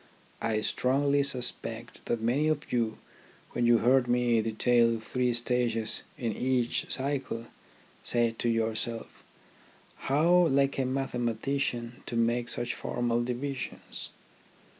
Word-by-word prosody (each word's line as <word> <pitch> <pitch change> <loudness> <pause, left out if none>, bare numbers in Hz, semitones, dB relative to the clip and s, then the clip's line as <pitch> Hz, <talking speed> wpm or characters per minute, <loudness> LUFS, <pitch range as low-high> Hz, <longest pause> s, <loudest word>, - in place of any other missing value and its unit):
I 110 -1 0
strongly 140 +5 +2
suspect 120 -3 -2
that 120 - 0
many 130 +7 +2
of 155 -1 -1
you, 115 -3 0 0.5
when 120 - +1
you 120 0 +6
heard 125 +2 +3
me 120 -2 +3
detail 115 +1 +3
the 115 - -3
three 125 +3 0
stages 120 -2 +1 0.2
in 115 -3 -2
each 125 -1 0
cycle, 135 -4 -2 0.6
said 115 -1 0
to 120 - +1
yourselves 115 0 -2 0.9
How 170 +5 +5
like 140 -1 +2
a 130 - +1
mathematician 125 -1 -2
to - - -3
make 120 +1 +1
such 120 0 +1
formal 120 -1 -1
divisions 125 +2 -4
120 Hz, 120 wpm, -29 LUFS, 115-135 Hz, 0.9 s, you